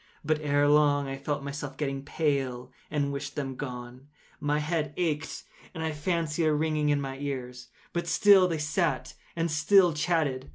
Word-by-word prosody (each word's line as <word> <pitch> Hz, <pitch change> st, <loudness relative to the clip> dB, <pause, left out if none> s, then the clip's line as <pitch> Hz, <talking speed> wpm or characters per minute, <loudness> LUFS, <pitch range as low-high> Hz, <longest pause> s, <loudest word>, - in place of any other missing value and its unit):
But, 155 Hz, 0 st, +1 dB
ere 145 Hz, -1 st, +2 dB
long, 145 Hz, -1 st, +4 dB
I 135 Hz, -, -3 dB
felt 140 Hz, +1 st, -3 dB
myself 140 Hz, -1 st, -6 dB
getting 135 Hz, -2 st, -2 dB
pale 135 Hz, -5 st, -1 dB, 0.2 s
and 145 Hz, -2 st, -1 dB
wished 140 Hz, 0 st, -5 dB
them 135 Hz, -2 st, -3 dB
gone. 125 Hz, 0 st, -7 dB, 0.3 s
My 145 Hz, 0 st, 0 dB
head 150 Hz, -1 st, -2 dB
ached, 160 Hz, -3 st, -2 dB, 0.3 s
and 160 Hz, -, -4 dB
I 160 Hz, -, -1 dB
fancied 160 Hz, +1 st, -1 dB
a 155 Hz, -, +3 dB
ringing 155 Hz, -1 st, +1 dB
in 145 Hz, -1 st, +3 dB
my 135 Hz, -1 st, -5 dB
ears: 125 Hz, -3 st, -5 dB, 0.3 s
but 170 Hz, 0 st, -2 dB
still 195 Hz, 0 st, +6 dB
they 165 Hz, -2 st, -1 dB
sat 155 Hz, +3 st, -1 dB, 0.2 s
and 165 Hz, -1 st, -1 dB
still 175 Hz, +3 st, +5 dB
chatted. 150 Hz, -4 st, 0 dB
150 Hz, 170 wpm, -28 LUFS, 140-160 Hz, 0.3 s, still